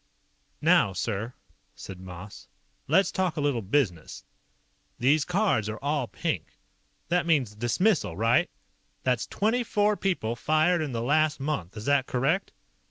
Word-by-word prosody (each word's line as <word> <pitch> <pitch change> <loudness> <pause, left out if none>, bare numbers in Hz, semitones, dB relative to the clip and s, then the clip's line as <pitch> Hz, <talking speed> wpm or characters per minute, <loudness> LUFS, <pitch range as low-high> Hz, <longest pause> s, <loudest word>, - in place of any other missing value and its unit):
"Now, 95 - +4
sir," 110 +5 -3 0.4
said 95 -2 -9
Moss. 95 +2 -10 0.4
"Let's 195 - +3
talk 185 -4 -1
a - - 0
little 145 -5 0
business. 95 - -1 0.7
These 145 +4 +3
cards 180 - +1
are 110 - -4
all 145 -1 -1
pink. - - -4 0.5
That 175 0 +1
means 135 -10 +2
dismissal, 120 - +1
right? 115 +3 +3 0.5
That's 125 -3 0
twenty 225 +4 0
four 210 -1 +1
people 170 - -1
fired 155 +6 +2
in 150 -3 -3
the 115 -1 -3
last 155 +3 +2
month, 135 - -3
is 105 - -7
that 140 -2 +2
correct?" 145 +10 0
135 Hz, 140 wpm, -27 LUFS, 110-165 Hz, 0.7 s, Now